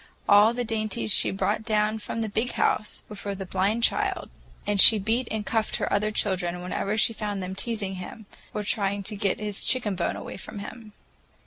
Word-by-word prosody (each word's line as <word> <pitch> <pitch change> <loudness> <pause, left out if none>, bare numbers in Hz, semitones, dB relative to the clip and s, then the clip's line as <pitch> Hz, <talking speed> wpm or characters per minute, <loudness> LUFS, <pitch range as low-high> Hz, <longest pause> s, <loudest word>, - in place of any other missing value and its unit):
All 205 +2 +6
the 245 - -1
dainties 215 - +1
she - - +7
brought 195 +2 -1
down 215 0 0
from 225 +2 -5
the 220 - -1
"Big 225 +4 -2
House" 210 - 0
were 210 - -9
for 200 0 -5
the 190 0 -6
blind 195 +5 0
child, - - +1 0.3
and 205 -2 +4
she 220 - +9
beat 225 +5 -1
and 215 -1 -3
cuffed 220 -1 -1
her - - -2
other 210 +1 +1
children 180 -4 -2
whenever 200 +3 -2
she 230 - +3
found 205 -3 -4
them 185 +1 -5
teasing 200 -2 -4
him 195 +4 -9 0.3
or 210 - -4
trying 200 -1 -1
to 210 +2 -3
get 200 -2 -1
his 210 -2 -3
chicken 240 -6 +3
bone 175 -2 -2
away - - -8
from 210 - -9
him. 210 +1 -9
210 Hz, 205 wpm, -25 LUFS, 195-220 Hz, 0.3 s, she